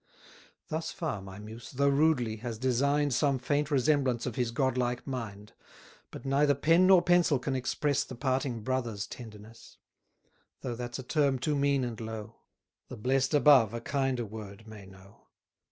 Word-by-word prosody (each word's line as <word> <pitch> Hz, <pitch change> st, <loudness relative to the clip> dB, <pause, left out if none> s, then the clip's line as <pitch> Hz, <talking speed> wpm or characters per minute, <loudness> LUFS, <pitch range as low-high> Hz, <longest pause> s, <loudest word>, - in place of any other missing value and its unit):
Thus 160 Hz, +1 st, -3 dB
far 155 Hz, -, -4 dB
my 95 Hz, 0 st, -10 dB
Muse, 110 Hz, +3 st, -10 dB
though 140 Hz, +2 st, +2 dB
rudely, 140 Hz, -6 st, +2 dB
has 115 Hz, 0 st, -5 dB
design'd 140 Hz, +4 st, +1 dB
Some 140 Hz, +1 st, +2 dB
faint 145 Hz, +3 st, -1 dB
resemblance 135 Hz, -4 st, +1 dB
of 125 Hz, -, -3 dB
his 125 Hz, -2 st, 0 dB
godlike 125 Hz, -1 st, -1 dB
mind: 105 Hz, -6 st, -6 dB, 0.6 s
But -, -, -10 dB
neither 140 Hz, +1 st, +3 dB
pen 165 Hz, +6 st, +4 dB
nor 185 Hz, -2 st, +6 dB
pencil 175 Hz, -5 st, +3 dB
can 135 Hz, +1 st, -3 dB
express 140 Hz, +2 st, 0 dB
The 130 Hz, -, -9 dB
parting 130 Hz, -2 st, -1 dB
brothers' 120 Hz, -5 st, -2 dB
tenderness: 110 Hz, -1 st, -12 dB, 0.8 s
Though 125 Hz, -, -3 dB
that's 120 Hz, 0 st, -5 dB
a 130 Hz, -, -7 dB
term 140 Hz, 0 st, +1 dB
too 145 Hz, +4 st, -1 dB
mean 140 Hz, -1 st, +2 dB
and 120 Hz, -2 st, -5 dB
low; 110 Hz, 0 st, -7 dB, 0.5 s
The -, -, -9 dB
blest 135 Hz, +5 st, +1 dB
above 135 Hz, -7 st, +5 dB
a -, -, -3 dB
kinder 135 Hz, -1 st, -1 dB
word 105 Hz, 0 st, -10 dB
may 105 Hz, -3 st, -11 dB
know. 95 Hz, +2 st, -18 dB
130 Hz, 160 wpm, -29 LUFS, 115-140 Hz, 0.8 s, nor